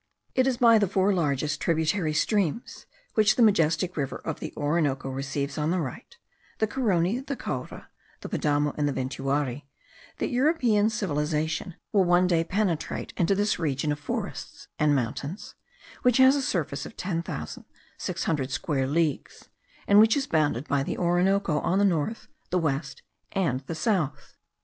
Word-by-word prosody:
It 260 0 +3
is 255 -2 +1
by 230 -2 +6
the 205 - +2
four 195 +2 +2
largest 150 -3 0
tributary 160 +1 +1
streams, 200 +4 -1 0.3
which 215 -1 +4
the 245 - +4
majestic 180 -3 +2
river 140 -3 -2
of 160 - -3
the - - -5
Orinoco 145 -3 0
receives 140 +2 -3
on 150 +1 0
the 180 +2 +1
right 175 - -6 0.4
(the 220 - +2
Carony, 210 -3 +1
the 275 +1 -4
Caura, - - -6 0.3
the - - -6
Padamo, 145 -1 0
and 145 -1 +2
the - - -2
Ventuari), 135 +1 -2 0.5
that - - -2
European 245 -6 +3
civilization 160 -3 -2 0.2
will 200 -2 +5
one 175 0 +4
day 170 -2 +2
penetrate 185 -3 -2
into 185 +2 +2
this 205 0 0
region 150 -2 -1
of 145 - -3
forests 145 - -5
and 150 -1 +3
mountains, 140 - -4 0.5
which 250 -2 +3
has 260 +1 +7
a 285 - 0
surface 165 - -2
of - - -14
ten 175 -3 -2
thousand 75 - -6 0.3
six - - -4
hundred 140 -5 -1
square 135 -1 -1
leagues, 155 0 -2 0.4
and 200 +1 +6
which 220 +4 +6
is 275 - 0
bounded 150 -4 0
by 140 -1 +1
the 135 - -3
Orinoco 175 -1 +2
on 185 - 0
the 200 - +4
north, 185 +4 -1 0.2
the 180 - +1
west, 140 -4 -2 0.3
and 170 -10 0
the 165 - -4
south. 160 - -1
165 Hz, 165 wpm, -26 LUFS, 145-205 Hz, 0.5 s, has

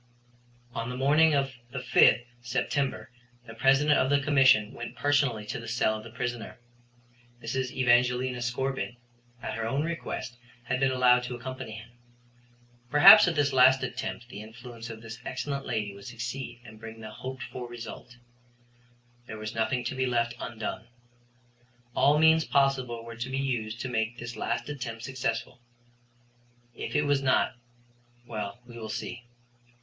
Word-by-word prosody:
On 115 +1 -3
the 125 - -5
morning 150 +4 +4
of 135 -1 0 0.2
the 135 - -6
5th 125 -1 +4 0.2
September 130 +2 -2 0.3
the 115 - -10
President 135 +5 +4
of 130 - +2
the 145 0 +4
Commission 135 -7 +4
went 120 - -7
personally 140 -7 +1
to - - -4
the 115 - -9
cell 115 -2 +1
of 110 - -7
the 115 - -10
prisoner. 120 0 -5 0.8
Mrs. 130 +3 -2
Evangelina 125 0 +2
Scorbitt, 125 +1 -2 0.5
at - - -3
her 115 -1 -3
own 135 +5 0
request, 165 -7 -4 0.3
had 130 +1 -1
been 135 0 +3
allowed 125 -1 +4
to 125 0 -5
accompany 130 -2 -7
him. 110 +1 -10 1.0
Perhaps 150 +10 +9
at 175 - 0
this 145 -2 +2
last 130 +1 +6
attempt 125 -1 -5
the 105 - -8
influence 115 +1 -10
of 115 0 -9
this 115 +1 -8
excellent 135 +2 -4
lady 105 -2 -2
would 100 0 -13
succeed 125 +1 -6
and 110 -1 -12
bring 115 0 -9
the 110 0 -8
hoped 130 +3 -7
for 125 -2 -7
result. 120 +1 -9 1.1
There 110 - -7
was 110 0 -5
nothing 120 +3 0
to 120 - -3
be 130 0 0
left 120 -1 +1
undone. 110 0 -5 1.1
All 145 +2 +4
means 160 +1 +5
possible 130 -5 +1
were 115 -1 -9
to 120 +2 -4
be 135 - -2
used 120 -5 -2
to - - -3
make 110 -1 -1
this 120 +1 -7
last - - -2
attempt 120 -6 -5
successful. 130 -1 -3 1.1
If - - -6
it 150 - +3
was 145 -1 +2
not 130 -1 +2 0.7
well, 110 0 -5
we 120 -1 -11
will 110 -1 -6
see. 120 +2 -5
125 Hz, 160 wpm, -28 LUFS, 115-135 Hz, 1.1 s, Perhaps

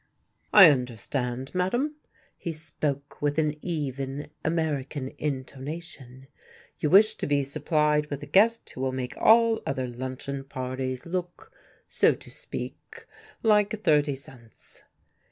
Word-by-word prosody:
"I 195 -6 +10
understand, 125 0 -3
madam," 240 +12 0 0.4
he 170 - -5
spoke 145 -2 -4
with 145 0 0
an 155 -2 +2
even 140 -3 -4
American 150 -4 -1
intonation, 135 -1 -6 0.5
"you 150 - 0
wish 210 +5 +6
to - - -4
be 145 -1 +2
supplied 150 +1 +1
with 145 -1 -5
a - - -5
guest 215 +10 +3
who - - -8
will 130 -1 0
make 130 -1 -4
all 225 0 +5
other 130 -1 -2
luncheon 130 +2 -5
parties 130 -1 -4
look, 180 - -5 0.4
so - - +3
to - - -15
speak, - - -8 0.4
like 210 -1 +3
thirty 150 -2 +3
cents." 125 -5 -13
145 Hz, 125 wpm, -27 LUFS, 130-170 Hz, 0.5 s, I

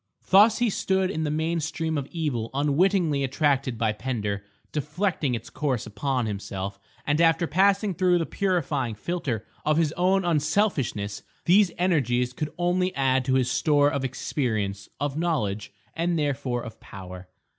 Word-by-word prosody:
Thus 210 +4 +7
he 240 -3 +2
stood 190 0 0
in 160 -4 -2
the - - -1
main 160 +3 0
stream 160 +1 -2
of 140 -2 -2
evil 145 -10 -2
unwittingly 150 +1 +2
attracted 135 -2 +1
by 110 -1 +1
Pender, 105 -3 -3 0.3
deflecting 150 -2 -1
its 115 - -8
course 135 -6 -1
upon 125 +4 -1
himself; 100 -1 -4 0.3
and 145 +2 +2
after 165 +1 +4
passing 195 +5 +2
through 180 +1 +3
the 165 - 0
purifying 145 - -1
filter 130 - -3 0.2
of 155 0 +2
his 160 -3 +2
own 185 +2 +2
unselfishness 150 - 0 0.2
these 195 +2 +5
energies 125 -9 +1
could 150 +4 -3
only 180 +1 +1
add 130 -1 +2
to 130 -1 +2
his 130 -1 +2
store 145 +1 +3
of 140 - -2
experience, 110 -6 -2
of 145 +1 -2
knowledge, 110 - -1 0.2
and 170 +1 0
therefore 130 -5 -1
of 115 - -9
power. 90 -3 -10
145 Hz, 155 wpm, -26 LUFS, 120-170 Hz, 0.3 s, Thus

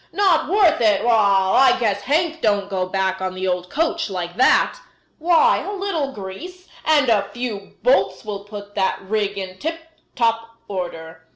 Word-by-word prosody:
"Not 375 -7 +2
worth 370 - +3
it? 210 -3 +3
Wall! 200 -5 +3
I 265 - +5
guess 205 -4 0
Hank 320 +6 0
don't 205 -2 0
go 185 -1 -1
back 190 0 -1
on 185 0 -3
the 185 0 -3
old 180 0 -2
coach 330 - -1
like 175 -2 -5
that. 260 - +3 0.4
Why, 350 +9 +4
a 405 - -5
little 375 -8 -2
grease 290 - -9 0.2
and 300 -3 +3
a 205 -4 +2
few 230 -5 -6
bolts - - +2
will 200 -2 -5
put 205 -1 -10
that 190 - 0
rig 205 0 -2
in 185 -1 -6
tip 325 +1 -3 0.4
top 230 -1 -1
order." 165 -4 -7
215 Hz, 170 wpm, -21 LUFS, 190-315 Hz, 0.4 s, I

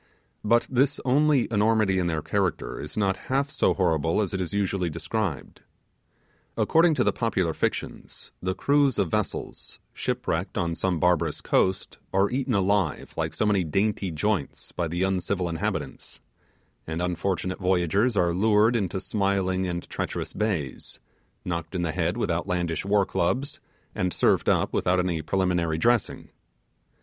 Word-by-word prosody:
But 115 +2 +3
this 135 +3 +1
only 140 0 +3
enormity 105 -3 +2
in 90 - 0
their 80 -3 -1
character 95 +2 -1
is 75 +5 -8
not 100 -2 +2
half 140 +2 +1
so - - +2
horrible 80 -3 +1
as 100 -3 -1
it 95 - -1
is 90 - -3
usually 95 -3 0
described. 85 -1 -4 1.0
According 165 0 +4
to - - +2
the - - +2
popular 95 -8 0
fictions, - - -4
the 95 0 -1
crews 140 -1 +2
of 95 -5 0
vessels, 105 -2 -3 0.2
shipwrecked - - -2
on 85 -1 0
some 90 0 -1
barbarous 90 0 +1
coast, 95 0 0
are 95 +1 +2
eaten 130 -2 0
alive 100 -4 0
like - - -2
so - - 0
many 100 -3 +2
dainty 95 +4 0
joints 85 -1 -2
by 85 - -2
the 85 +3 -1
uncivil 95 -1 0
inhabitants; 80 -1 -4 0.7
and 80 +1 -3
unfortunate 90 +1 -2
voyagers 95 +5 +1
are 85 -2 +3
lured 105 +4 +3
into 95 -4 -1
smiling 95 -1 0
and 85 -1 -4
treacherous - - -4
bays; 95 -10 -3 0.5
knocked 85 +1 -4
on 90 - -1
the 85 - -1
head 80 0 -1
with - - 0
outlandish 85 -2 -1
war 100 0 +2
clubs; 130 +13 -1 0.3
and 90 -1 -1
served - - +2
up - - +1
without 90 +1 +2
any 90 -3 0
prelimary 85 -2 0
dressing. 120 +4 +1
95 Hz, 150 wpm, -26 LUFS, 85-105 Hz, 1.0 s, According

